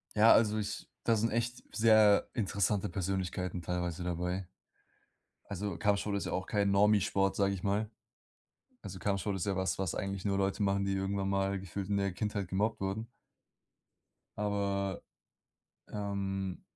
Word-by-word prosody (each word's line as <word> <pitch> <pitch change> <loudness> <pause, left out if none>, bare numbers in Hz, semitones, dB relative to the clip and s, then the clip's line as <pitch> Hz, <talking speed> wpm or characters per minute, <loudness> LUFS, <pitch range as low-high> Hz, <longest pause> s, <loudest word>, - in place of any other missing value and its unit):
Ja, 110 +2 +8
also 110 -1 +4
ich 105 -2 -4 0.2
da 115 - +3
sind 115 +1 +1
echt 120 +2 -2
sehr 110 -2 +5
interessante 100 -2 0
Persönlichkeiten 90 -1 -2
teilweise 90 0 -2
dabei. 90 +1 -2 1.0
Also, 100 -2 -4
Kampfsport 105 -1 +1
ist 100 - -2
ja - - -3
auch 95 - -1
kein 100 -1 +1
Normi-Sport, 100 -1 +3
sage 100 -1 +2
ich 90 - -8
mal. 105 +2 0 0.9
Also, 95 -2 -7
Kampfsport 100 0 -1
ist 95 - -2
ja 100 -2 0
was, 95 0 0
was 95 -3 -1
eigentlich 95 -1 -3
nur 100 -1 +1
Leute 95 +1 0
machen, 100 0 +1
die 100 - 0
irgendwann 95 0 -1
mal 95 0 0
gefühlt 95 +1 -5
in 100 - +2
der 100 -2 0
Kindheit 105 -1 -2
gemobbt 105 +4 0
wurden. 100 +4 -2 1.3
Aber, 100 -2 -1 0.9
ähm, 95 -2 -3
100 Hz, 150 wpm, -32 LUFS, 95-105 Hz, 1.3 s, Ja